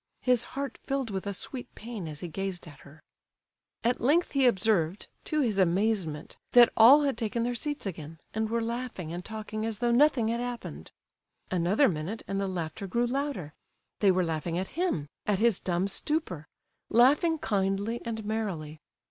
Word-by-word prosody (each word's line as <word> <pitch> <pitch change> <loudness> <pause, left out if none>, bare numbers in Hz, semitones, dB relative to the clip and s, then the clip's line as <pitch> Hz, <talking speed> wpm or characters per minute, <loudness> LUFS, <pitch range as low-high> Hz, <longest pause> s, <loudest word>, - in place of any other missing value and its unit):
His 250 -2 +3
heart 280 -1 -4
filled 270 -4 -2
with 190 0 -4
a - - -1
sweet 250 +6 -6
pain 220 -6 -6
as 150 -1 -7
he 175 - -4
gazed 190 +1 -4
at 145 -4 -13
her. 150 +2 -16 0.8
At 240 +2 +1
length 310 +8 +3
he 270 -2 +4
observed, 190 -5 +1 0.2
to 305 -1 0
his 220 -7 +1
amazement, 185 -4 0 0.2
that 240 -1 +8
all 265 +7 +8
had 275 -3 +1
taken 230 0 -2
their 245 +1 -1
seats 290 +3 -3
again, 160 -4 -6 0.2
and 220 0 -1
were 230 0 0
laughing 235 -8 -4
and 175 +1 -5
talking 215 0 -5
as 225 -1 -2
though 240 +2 +1
nothing 245 -3 +4
had 235 +1 -1
happened. 240 - -6 0.6
Another 185 +10 +3
minute 175 +6 -3
and 195 0 -1
the 195 - -1
laughter 185 +2 -4
grew 235 +6 +1
louder—they 240 - -3
were 185 -1 +3
laughing 165 +1 -2
at 190 +1 -3
him, 335 - -1 0.2
at 205 -2 +2
his 230 -1 +3
dumb 180 +1 0
stupor—laughing 275 - 0
kindly 200 0 -1
and 220 -2 -4
merrily. 185 -9 -3
215 Hz, 170 wpm, -28 LUFS, 180-245 Hz, 0.8 s, that